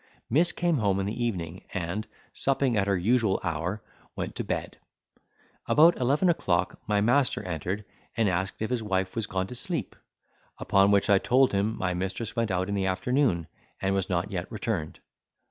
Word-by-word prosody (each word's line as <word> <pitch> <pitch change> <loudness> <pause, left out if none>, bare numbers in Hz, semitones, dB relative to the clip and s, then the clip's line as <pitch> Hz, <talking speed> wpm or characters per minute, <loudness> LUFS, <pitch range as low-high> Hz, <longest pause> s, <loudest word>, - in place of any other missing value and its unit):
Miss 165 +7 +4
came 170 -4 0
home 100 -3 +1
in 95 - -1
the 110 +4 -2
evening, 90 -6 -3
and, 95 +4 -3 0.3
supping 135 -2 +1
at 100 -1 +1
her 100 -1 +2
usual 110 +1 +2
hour, 85 +4 -2 0.3
went - - -4
to - - -1
bed. - - -4 0.9
About 165 +3 +6
eleven 140 +8 +2
o'clock 95 - 0
my 105 0 +2
master 125 +5 +3
entered, 90 +4 -3 0.3
and 115 -2 +3
asked 95 +3 -1
if 110 - -3
his 125 -2 0
wife 95 -3 -1
was 115 -2 -1
gone 95 0 -1
to 110 - -8
sleep: 125 - -3 0.6
upon 100 0 +3
which 100 -1 +3
I 100 -1 +5
told 130 +4 +3
him, 105 +3 0
my 90 -1 -1
mistress 95 +5 -3
went 115 -1 0
out 95 0 0
in 100 - -2
the 95 -1 0
afternoon, 95 - +1 0.3
and 95 0 0
was 95 -1 -1
not 90 +3 -1
yet 90 +1 -4
returned. 105 -7 -3
100 Hz, 180 wpm, -27 LUFS, 95-115 Hz, 0.9 s, About